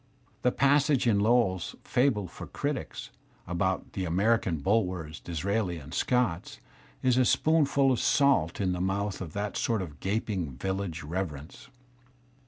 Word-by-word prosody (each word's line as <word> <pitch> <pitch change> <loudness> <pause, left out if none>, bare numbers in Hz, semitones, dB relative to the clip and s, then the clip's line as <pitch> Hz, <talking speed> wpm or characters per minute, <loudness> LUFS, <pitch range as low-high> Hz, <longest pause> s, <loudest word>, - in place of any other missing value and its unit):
The 125 - +3
passage 140 0 +3
in 110 -4 +3
Lowell's 105 -4 +2
"Fable 120 -7 +1
for 85 - -9
Critics" - - -4 0.3
about 95 +2 -2
"The 95 - -3
American 95 +1 +1
Bulwers, 90 -3 -1
Disraelis 90 +1 -2
and 70 +2 -11
Scotts 120 -9 0 0.2
" - - -28
is 130 -1 +3
a - - +5
spoonful 140 -1 +3
of 125 - +1
salt 135 - +2
in 95 -3 +1
the 90 0 -2
mouth 100 +2 -1
of 80 -5 -6
that 100 0 -3
sort 110 -5 0
of 75 -5 -10
gaping 95 - -2
viUage 95 -5 -3
reverence. 85 - -5
95 Hz, 145 wpm, -28 LUFS, 85-120 Hz, 0.3 s, a